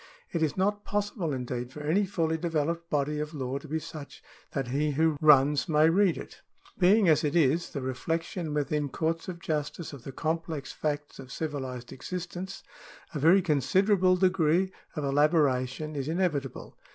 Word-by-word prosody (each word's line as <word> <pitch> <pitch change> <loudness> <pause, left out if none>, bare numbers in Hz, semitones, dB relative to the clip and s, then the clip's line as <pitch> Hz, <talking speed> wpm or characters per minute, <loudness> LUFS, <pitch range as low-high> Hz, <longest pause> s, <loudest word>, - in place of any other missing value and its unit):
It 170 - -1
is 155 0 0
not 205 +2 +1
possible, 205 -6 -2
indeed, 125 -1 -4
for 150 - -8
any 180 +7 +1
fully 165 -4 0
developed 165 0 -2
body 150 +1 0
of 150 +1 -4
law 135 -1 -3
to 155 - -12
be 155 +2 -1
such 155 -2 -9 0.3
that 135 -3 -3
he 145 +3 0
who 160 +2 +2
runs 150 +1 +5
may 155 +1 +5
read 190 0 +3
it. - - -10 0.4
Being, 195 +2 +5
as 155 -2 +4
it 150 +1 0
is, 165 +1 +3
the 140 - -5
reflection 165 +5 -3
within 150 0 0
courts 165 +4 -2
of 180 -2 -6
justice 155 0 -3
of 135 -4 -10
the 135 - -7
complex 160 -1 -3
facts 145 -1 -3
of 130 -2 -10
civilised 130 -6 -5
existence, 180 +5 -6 0.5
a 150 - -3
very 175 +6 +5
considerable 185 +4 +3
degree 185 -1 +2 0.2
of 150 - -3
elaboration 145 0 +1
is 140 -1 -3
inevitable. 155 -6 -2
155 Hz, 165 wpm, -28 LUFS, 140-175 Hz, 0.5 s, runs